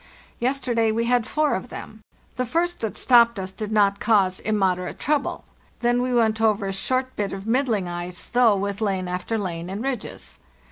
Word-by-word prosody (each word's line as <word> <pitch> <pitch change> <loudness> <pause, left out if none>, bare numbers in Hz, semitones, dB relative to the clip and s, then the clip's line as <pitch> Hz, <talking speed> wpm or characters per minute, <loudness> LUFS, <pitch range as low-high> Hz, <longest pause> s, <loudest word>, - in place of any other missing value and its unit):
Yesterday 240 -3 +1
we 230 +2 0
had 245 -1 +2
four 305 -1 +1
of 190 +6 -3
them. 215 0 -9 0.3
The 255 - -1
first 345 +6 0
that 220 -2 -3
stopped 235 -2 +5
us 190 -1 -4
did 215 +2 -6
not 200 -2 +3
cause 195 -5 +2
immoderate 190 -4 0
trouble; 295 -1 -1 0.4
then 240 0 +2
we 250 0 -1
went 225 -2 +2
over 215 -2 +2
a 195 - -2
short 255 +6 -1
bit 200 -2 -2
of 195 0 -6
middling 225 -5 +1
ice, 175 0 -4
though, 240 -3 +4
with 200 +1 -3
lane 190 -3 -1
after 180 +5 -2
lane 175 -4 -4
and 200 +4 -4
ridges. 265 -4 -5
220 Hz, 185 wpm, -24 LUFS, 195-245 Hz, 0.4 s, stopped